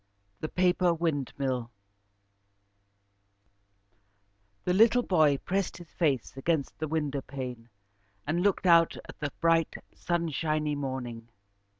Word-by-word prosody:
The 155 - -4
Paper 180 -1 +2
Windmill 135 -6 -2 2.9
The 180 - +1
little 230 +5 +5
boy 155 -8 +3
pressed 190 +5 -2
his 175 -2 -13
face 140 -9 0
against 140 +1 -1
the 155 - -2
window 145 -3 -1
pane 125 -4 -7 0.6
and 160 +4 0
looked 195 0 +1
out 170 -2 +5
at - - -11
the 145 -2 -3
bright 165 -1 +2 0.2
sunshiny 155 -3 -1
morning. 125 -5 -5
155 Hz, 105 wpm, -29 LUFS, 135-170 Hz, 2.9 s, little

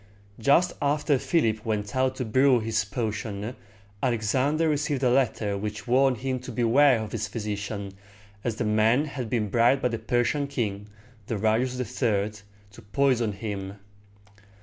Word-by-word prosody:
Just 155 +9 +3
after 145 -1 +1
Philip 110 -11 +1
went 105 -1 -3
out 130 0 +1
to 130 - -3
brew 130 +3 +4
this 110 0 0
potion, 110 +1 -4 0.5
Alexander 130 +6 +1
received 150 -2 0
a 125 - +4
letter 115 -5 +1
which 105 +1 -5
warned 130 +1 +3
him 130 +1 -2
to 130 - -8
beware 125 +3 +4
of 110 -1 -5
his 105 -2 -3
physician, 105 -1 -4 0.5
as 120 -3 -1
the 110 - -2
man 110 +6 +3
had 130 -6 -5
been 110 -4 0
bribed 120 +6 +3
by 125 - +3
the 115 -1 -3
Persian 120 +6 0
king, 105 -7 -3 0.4
Darius 115 +4 0
III., 110 -4 0 0.4
to - - -14
poison 125 -6 +2
him. 100 -2 -5
115 Hz, 150 wpm, -26 LUFS, 105-130 Hz, 0.5 s, brew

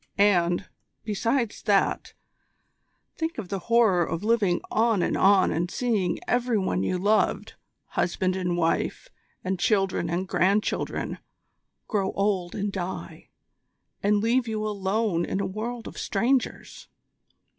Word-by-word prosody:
And, 180 -3 +3 0.4
besides 230 +2 -1
that, 200 -2 +1 1.0
think 325 0 -3
of 205 -6 -5
the 195 - -2
horror 220 -7 +4
of 165 +2 -3
living 210 -5 +2
on 225 -4 +2
and - - 0
on 195 -1 +4
and 170 +3 -1
seeing 215 -5 0
every 245 -2 +1
one 185 - 0
you 140 - 0
loved 205 +4 +1 0.4
husband 185 +1 0
and 180 -2 -1
wife, 165 - -1 0.3
and 185 0 -2
children 195 -1 +1
and 180 +3 -2
grandchildren 200 +4 0 0.7
grow 200 -4 -1
old 195 -3 0
and 205 0 -2
die, 185 -1 -6 0.7
and 205 0 +2
leave 240 +2 +2
you 215 -1 -2
alone 200 -2 0
in 190 - -2
a - - 0
world 225 +4 -5
of - - -8
strangers. 245 +4 -1
200 Hz, 130 wpm, -26 LUFS, 185-225 Hz, 1.0 s, horror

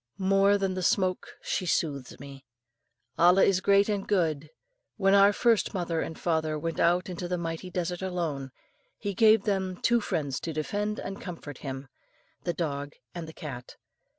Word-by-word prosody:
More 195 +1 +4
than 195 -1 -1
the 185 - -3
smoke 185 0 +1
she 185 - -2
soothes 140 -6 -1
me. 135 0 -10 0.8
Allah 180 +3 +6
is 185 -1 +3
great 200 +1 +4
and 205 -2 -2
good; 155 -7 0 0.5
when 195 -2 +3
our 200 0 +7
first 225 0 +2
mother 170 -3 -1
and 160 - -5
father 160 -2 0
went 165 +2 -3
out 175 +2 +3
into 180 -1 -5
the 180 0 -1
mighty 165 +1 -4
desert 180 0 -3
alone, 165 -8 -3 0.5
He 205 -1 -3
gave 220 +1 +5
them 190 -3 -1
two 235 0 +3
friends 145 -9 -2
to 165 - -4
defend 205 +8 -2
and 195 +1 -6
comfort 160 -6 -8
them 135 -1 -6 0.6
the 175 - 0
dog 145 -4 -3 0.2
and 170 -2 -6
the 160 - -10
cat. 130 -7 -8
180 Hz, 170 wpm, -28 LUFS, 155-195 Hz, 0.8 s, our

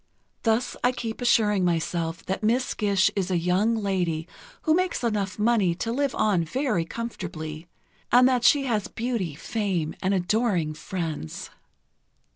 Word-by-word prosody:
Thus 225 +2 +1
I 250 +1 +3
keep 230 -1 -5
assuring 210 -5 +3
myself 165 -1 -1
that 190 - -2
Miss 240 +4 +1
Gish 200 -3 +2
is 195 -2 -1
a 180 - +1
young 185 +7 +2
lady 180 -6 -1 0.4
who 315 - +3
makes 365 -4 0
enough 205 -5 -1
money 210 -5 +2
to 225 +6 -3
live 275 +2 0
on 195 -6 +2
very 215 - -1
comfortably, 165 -7 -6 0.4
and 250 +1 +7
that 250 -2 +2
she 285 +3 +5
has 215 -6 0
beauty, 225 - -3
fame 180 -3 -2
and 190 - +1
adoring 185 -4 +1
friends. 160 - -5
205 Hz, 145 wpm, -26 LUFS, 170-235 Hz, 0.4 s, and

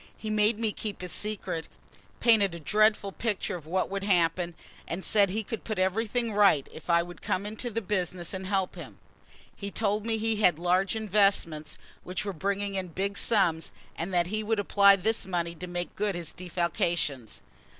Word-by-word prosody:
He 215 - -4
made 215 +1 +3
me 225 -1 0
keep 205 -2 -5
his 180 -1 -5
secret, 190 -6 -3 0.5
painted 205 -6 +4
a - - -7
dreadful 210 +3 +2
picture 210 -2 -2
of 160 -3 -9
what 185 +3 0
would 195 0 -4
happen, 175 -2 +2 0.3
and 185 +3 -4
said 200 -2 +4
he 215 +4 -2
could 225 +2 -5
put 215 - -3
everything 220 +5 0
right 200 -9 +4
if 160 - -12
I 170 0 +4
would 175 -1 -11
come 190 +2 -1
into 220 +4 -3
the 230 0 -3
business 180 -3 -1
and 190 0 -4
help 190 -2 0
him. - - -10 0.6
He 200 - -5
told 210 0 0
me 225 -1 +1
he 220 0 0
had 180 -6 +4
large 180 +4 +1
investments 195 -7 +1 0.3
which 180 +2 -4
were 200 - -3
bringing 200 +3 -2
in 190 -1 -2
big 195 +4 -2
sums 175 -9 +2 0.2
and 170 +4 -4
that 175 -1 +2
he 215 - 0
would 220 +1 0
apply 200 0 +6
this 205 +1 -1
money 170 -2 -1
to 180 +2 -8
making 175 0 -4
good 205 -2 -1
his 170 -2 -3
defalcations. 170 - -2
195 Hz, 190 wpm, -28 LUFS, 175-210 Hz, 0.6 s, apply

